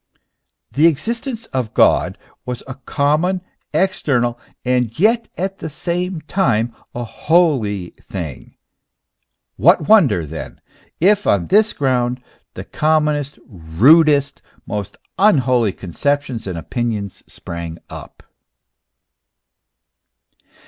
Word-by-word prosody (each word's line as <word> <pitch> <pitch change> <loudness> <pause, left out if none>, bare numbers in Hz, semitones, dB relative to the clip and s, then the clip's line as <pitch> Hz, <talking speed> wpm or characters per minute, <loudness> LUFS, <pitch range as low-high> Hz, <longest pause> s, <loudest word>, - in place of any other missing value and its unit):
The 155 +4 +4
existence 230 - -2
of 125 -4 -2
God - - +3 0.3
was 125 -1 -5
a 130 - -7
common, 150 +7 0 0.3
external, 125 -11 0 0.3
and 125 0 0
yet 230 +4 +2
at 195 +2 -3
the 160 - -5
same 175 +2 -3
time 120 - 0 0.2
a 120 - -3
holy 120 - +1
thing: 80 -8 -7 1.0
what 150 - +4
wonder, 130 - +4
then, 80 +1 -8 0.4
if 205 +3 +3
on 95 -4 +2
this 215 +1 +3
ground 125 -3 0 0.4
the - - -6
commonest, 150 -2 0
rudest, 140 - +3 0.2
most 105 -2 -5 0.2
unholy 130 - +3
conceptions 125 - -2
and 90 -3 -4
opinions 105 0 -4
sprang 85 -1 -7
up - - -11
135 Hz, 100 wpm, -19 LUFS, 110-170 Hz, 1.0 s, The